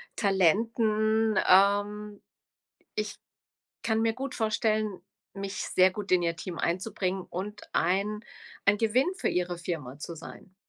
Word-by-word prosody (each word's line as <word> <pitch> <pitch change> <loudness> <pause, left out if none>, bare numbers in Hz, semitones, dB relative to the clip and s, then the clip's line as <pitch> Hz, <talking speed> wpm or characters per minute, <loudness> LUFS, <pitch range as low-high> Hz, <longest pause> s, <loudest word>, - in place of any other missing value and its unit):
Talenten, 215 +2 +2
ähm. 205 +2 +3 0.8
Ich 210 0 -2 0.7
kann 220 0 +1
mir 225 0 +2
gut 265 +1 -5
vorstellen, 215 -2 0 0.3
mich 195 0 -5 0.2
sehr 185 0 +6
gut 200 0 -5
in 180 -1 +5
Ihr 170 0 0
Team 170 +1 -6
einzubringen 185 +1 -1
und 200 +4 -5
ein 200 +5 +1 0.5
ein 205 +1 +5
Gewinn 235 +5 +3
für - - -1
Ihre 180 0 -1
Firma 150 -6 -5
zu 170 - -6
sein.“ 170 +3 -11
200 Hz, 130 wpm, -28 LUFS, 180-215 Hz, 0.8 s, sehr